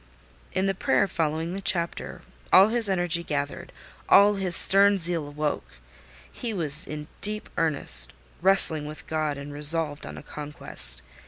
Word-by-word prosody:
In 190 Hz, +1 st, -3 dB
the 195 Hz, -, -2 dB
prayer 195 Hz, +1 st, -2 dB
following 160 Hz, 0 st, -5 dB
the 195 Hz, -, -7 dB
chapter, 170 Hz, -3 st, -5 dB, 0.3 s
all 195 Hz, +3 st, +5 dB
his 230 Hz, -2 st, -1 dB
energy 175 Hz, -2 st, -2 dB
gathered—all 145 Hz, -, -2 dB
his 190 Hz, -3 st, +1 dB
stern 200 Hz, +2 st, +7 dB
zeal 165 Hz, -4 st, -3 dB
woke: 145 Hz, -, -6 dB, 0.6 s
he 230 Hz, -3 st, -8 dB
was 155 Hz, -4 st, 0 dB
in 150 Hz, 0 st, -9 dB
deep 210 Hz, +1 st, -4 dB
earnest, 140 Hz, -, +4 dB, 0.3 s
wrestling 165 Hz, -5 st, +2 dB
with 155 Hz, +1 st, -12 dB
God, 155 Hz, -2 st, -5 dB
and 140 Hz, +1 st, -11 dB
resolved 150 Hz, 0 st, -1 dB
on -, -, -11 dB
a -, -, -12 dB
conquest. 65 Hz, -, -3 dB
160 Hz, 145 wpm, -23 LUFS, 150-190 Hz, 0.6 s, stern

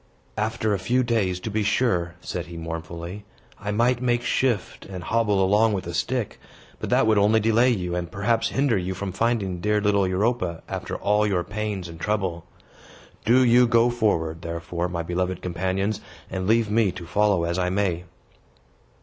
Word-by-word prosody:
"After 110 Hz, 0 st, 0 dB
a 100 Hz, -, 0 dB
few 125 Hz, +7 st, +1 dB
days, 105 Hz, -7 st, 0 dB
to 110 Hz, -, -4 dB
be 110 Hz, +1 st, 0 dB
sure," 100 Hz, -6 st, +1 dB
said -, -, -5 dB
he, 85 Hz, 0 st, -8 dB
mournfully, 85 Hz, +4 st, -6 dB, 0.4 s
"I 105 Hz, -, -5 dB
might 120 Hz, +4 st, +2 dB
make 120 Hz, -1 st, +1 dB
shift 120 Hz, -8 st, -1 dB
to 90 Hz, -, -5 dB
hobble 100 Hz, +1 st, +1 dB
along 105 Hz, +3 st, +3 dB
with 95 Hz, -3 st, -2 dB
a -, -, -5 dB
stick. -, -, -2 dB, 0.4 s
But -, -, -4 dB
that -, -, +4 dB
would 110 Hz, -2 st, +4 dB
only 105 Hz, +2 st, +4 dB
delay 115 Hz, +3 st, +3 dB
you, 90 Hz, -7 st, -1 dB
and 90 Hz, -1 st, -3 dB
perhaps 110 Hz, +3 st, +1 dB
hinder 135 Hz, -4 st, +1 dB
you 95 Hz, +1 st, -3 dB
from 95 Hz, +1 st, -4 dB
finding 100 Hz, -4 st, -1 dB
dear 105 Hz, +1 st, +2 dB
little 100 Hz, -2 st, +2 dB
Europa, 95 Hz, -2 st, -1 dB
after -, -, -4 dB
all 105 Hz, +1 st, +2 dB
your 90 Hz, -4 st, 0 dB
pains 105 Hz, -3 st, -4 dB
and 85 Hz, -1 st, -10 dB
trouble. 95 Hz, -4 st, -2 dB, 0.8 s
Do 125 Hz, +4 st, +5 dB
you 120 Hz, 0 st, +5 dB
go 115 Hz, +1 st, +4 dB
forward, 85 Hz, -9 st, 0 dB
therefore, 85 Hz, +1 st, -3 dB
my 85 Hz, -2 st, -3 dB
beloved 90 Hz, +1 st, -2 dB
companions, 95 Hz, +4 st, -2 dB, 0.3 s
and 95 Hz, -1 st, -3 dB
leave 110 Hz, -1 st, +3 dB
me 110 Hz, -3 st, +3 dB
to 90 Hz, -2 st, -8 dB
follow 100 Hz, 0 st, +2 dB
as 85 Hz, +2 st, -1 dB
I 90 Hz, 0 st, +1 dB
may." 90 Hz, -3 st, -1 dB
100 Hz, 180 wpm, -24 LUFS, 90-110 Hz, 0.8 s, Do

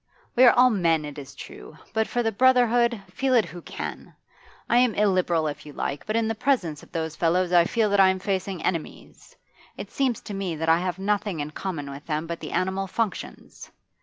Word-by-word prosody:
'We 255 Hz, -, +7 dB
are 240 Hz, -, +8 dB
all 250 Hz, 0 st, +5 dB
men, 165 Hz, -7 st, +1 dB
it 145 Hz, 0 st, -7 dB
is 135 Hz, -, -11 dB
true; -, -, -11 dB, 0.2 s
but 220 Hz, 0 st, +1 dB
for 240 Hz, -, -1 dB
the 225 Hz, -, +1 dB
brotherhood 240 Hz, -1 st, +3 dB
feel 265 Hz, -1 st, +1 dB
it 230 Hz, -, +4 dB
who 170 Hz, +2 st, -10 dB
can! -, -, -7 dB, 0.5 s
I 240 Hz, -, +4 dB
am 245 Hz, -4 st, +3 dB
illiberal, 185 Hz, -5 st, +2 dB
if 150 Hz, -1 st, -4 dB
you 150 Hz, -, -11 dB
like, 140 Hz, +1 st, -4 dB
but 215 Hz, -, -1 dB
in 230 Hz, -1 st, +1 dB
the 225 Hz, -, 0 dB
presence 225 Hz, -, 0 dB
of -, -, -17 dB
those 160 Hz, -1 st, -3 dB
fellows 175 Hz, +2 st, +1 dB
I 170 Hz, -1 st, +6 dB
feel 225 Hz, +3 st, +1 dB
that 200 Hz, -, +3 dB
I 190 Hz, -1 st, +7 dB
am 190 Hz, -, +1 dB
facing 190 Hz, -2 st, -3 dB
enemies. 170 Hz, -4 st, -5 dB, 0.4 s
It -, -, -8 dB
seems 260 Hz, -5 st, 0 dB
to 210 Hz, -, -8 dB
me 195 Hz, -4 st, -3 dB
that 160 Hz, +1 st, -2 dB
I 165 Hz, +1 st, +5 dB
have 180 Hz, 0 st, -2 dB
nothing 205 Hz, -2 st, -1 dB
in 145 Hz, +1 st, -4 dB
common 155 Hz, -5 st, -5 dB
with 140 Hz, +2 st, -10 dB
them 155 Hz, 0 st, -2 dB
but 170 Hz, 0 st, -5 dB
the -, -, -7 dB
animal 190 Hz, +1 st, -1 dB
functions. 220 Hz, +2 st, -5 dB
190 Hz, 220 wpm, -25 LUFS, 165-225 Hz, 0.5 s, are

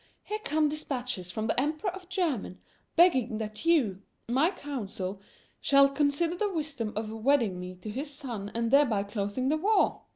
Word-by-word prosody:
Here 425 Hz, +1 st, -4 dB
come 305 Hz, +1 st, +2 dB
dispatches 250 Hz, -10 st, -3 dB
from 215 Hz, +5 st, -3 dB
the 220 Hz, -, +1 dB
Emperor 310 Hz, +7 st, -1 dB
of 370 Hz, -1 st, -11 dB
Germany 310 Hz, -, -1 dB, 0.4 s
begging 260 Hz, -10 st, +4 dB
that 215 Hz, +5 st, -6 dB
you, 235 Hz, -, +3 dB, 0.3 s
my 265 Hz, +8 st, +3 dB
council, 210 Hz, -, -5 dB, 0.4 s
shall 275 Hz, 0 st, +6 dB
consider 290 Hz, +4 st, +1 dB
the 410 Hz, +2 st, -1 dB
wisdom 295 Hz, -, -3 dB
of 215 Hz, 0 st, -3 dB
wedding 225 Hz, -4 st, +2 dB
me 180 Hz, 0 st, -7 dB
to 185 Hz, +4 st, -8 dB
his 280 Hz, +6 st, -3 dB
son 235 Hz, -8 st, -5 dB
and 230 Hz, 0 st, 0 dB
thereby 260 Hz, -8 st, +4 dB
closing 205 Hz, +5 st, -2 dB
the 310 Hz, -, +2 dB
war! 400 Hz, +4 st, +2 dB
265 Hz, 165 wpm, -29 LUFS, 215-310 Hz, 0.4 s, shall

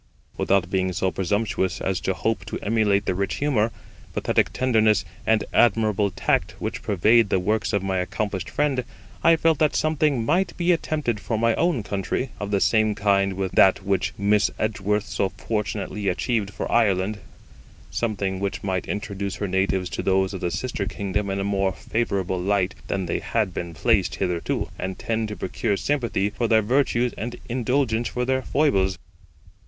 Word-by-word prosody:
Without 95 Hz, -2 st, +1 dB
being 95 Hz, -1 st, +1 dB
so 95 Hz, 0 st, 0 dB
presumptuous 95 Hz, -1 st, -1 dB
as 95 Hz, -1 st, -1 dB
to 95 Hz, -, -1 dB
hope 110 Hz, +4 st, -1 dB
to -, -, -4 dB
emulate 105 Hz, -2 st, +2 dB
the -, -, +1 dB
rich 100 Hz, +2 st, -1 dB
humour, 120 Hz, -6 st, +1 dB, 0.4 s
pathetic -, -, +1 dB
tenderness, 110 Hz, -4 st, +2 dB, 0.2 s
and 110 Hz, -1 st, +3 dB
admirable 110 Hz, -3 st, +3 dB
tact 95 Hz, 0 st, 0 dB
which -, -, -4 dB
pervade 105 Hz, +3 st, +3 dB
the -, -, +2 dB
works 105 Hz, +4 st, 0 dB
of 100 Hz, -3 st, 0 dB
my 95 Hz, -1 st, 0 dB
accomplished 95 Hz, 0 st, -3 dB
friend, 140 Hz, -4 st, 0 dB, 0.4 s
I 165 Hz, -, +6 dB
felt 160 Hz, -2 st, +2 dB
that 155 Hz, -1 st, +2 dB
something 150 Hz, -6 st, +1 dB
might 175 Hz, +5 st, +1 dB
be 175 Hz, 0 st, +2 dB
attempted 150 Hz, -9 st, -1 dB
for 110 Hz, +2 st, -2 dB
my 115 Hz, +1 st, +3 dB
own 165 Hz, -8 st, +1 dB
country, 100 Hz, +6 st, -2 dB
of 105 Hz, -, -4 dB
the 100 Hz, -1 st, +1 dB
same 110 Hz, 0 st, +3 dB
kind 100 Hz, -1 st, +2 dB
with 95 Hz, -1 st, -2 dB
that 95 Hz, 0 st, +5 dB
which 100 Hz, -1 st, +1 dB
Miss 105 Hz, +1 st, +3 dB
Edgeworth 105 Hz, -1 st, 0 dB
so 95 Hz, -, -1 dB
fortunately 105 Hz, -1 st, -3 dB
achieved 100 Hz, +2 st, 0 dB
for 100 Hz, -, -5 dB
Ireland 105 Hz, -2 st, +2 dB, 0.7 s
something 100 Hz, -4 st, -1 dB
which 100 Hz, 0 st, -3 dB
might 95 Hz, -2 st, -2 dB
introduce 100 Hz, -2 st, -3 dB
her 100 Hz, -, -3 dB
natives 95 Hz, 0 st, 0 dB
to -, -, -3 dB
those 95 Hz, 0 st, +1 dB
of 95 Hz, -, -5 dB
the 90 Hz, -, 0 dB
sister 100 Hz, +3 st, -3 dB
kingdom 100 Hz, 0 st, -2 dB
in 95 Hz, 0 st, -1 dB
a -, -, -1 dB
more 100 Hz, -1 st, 0 dB
favourable 95 Hz, -4 st, -2 dB
light 100 Hz, 0 st, +1 dB
than 95 Hz, -2 st, -1 dB
they 85 Hz, -, -1 dB
had 110 Hz, -5 st, -1 dB
been 85 Hz, -1 st, -5 dB
placed 100 Hz, +2 st, +2 dB
hitherto, 90 Hz, -3 st, -1 dB
and 95 Hz, 0 st, -4 dB
tend 115 Hz, -1 st, -1 dB
to 105 Hz, -, -5 dB
procure 100 Hz, +2 st, -1 dB
sympathy 115 Hz, -8 st, 0 dB
for 115 Hz, +2 st, -1 dB
their 110 Hz, -1 st, +4 dB
virtues 125 Hz, 0 st, +1 dB
and 120 Hz, +2 st, -4 dB
indulgence 120 Hz, -1 st, 0 dB
for 125 Hz, +2 st, -2 dB
their 130 Hz, +1 st, +1 dB
foibles. 95 Hz, -12 st, +1 dB
105 Hz, 175 wpm, -24 LUFS, 95-115 Hz, 0.7 s, I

